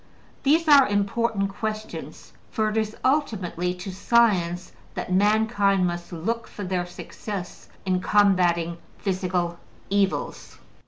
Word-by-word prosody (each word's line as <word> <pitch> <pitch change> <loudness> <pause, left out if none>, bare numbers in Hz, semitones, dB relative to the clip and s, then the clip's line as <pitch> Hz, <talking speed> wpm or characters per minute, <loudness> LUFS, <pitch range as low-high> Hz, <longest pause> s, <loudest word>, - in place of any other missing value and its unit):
These 315 +4 +3
are 280 -3 +8
important 205 0 0
questions; 215 +1 -6 0.2
for 215 -1 0
it - - -5
is 220 0 -1
ultimately 195 - 0
to 180 +2 -7
science 185 -5 +2 0.2
that - - -4
mankind 205 -1 +3
must 175 0 -4
look 225 +8 -3
for 205 - -8
their 180 -1 -2
success 185 +1 -7 0.2
in 185 -1 +1
combating 175 -5 +2 0.2
physical 180 -3 -1 0.3
evils. 200 -1 -1
195 Hz, 115 wpm, -25 LUFS, 180-220 Hz, 0.3 s, are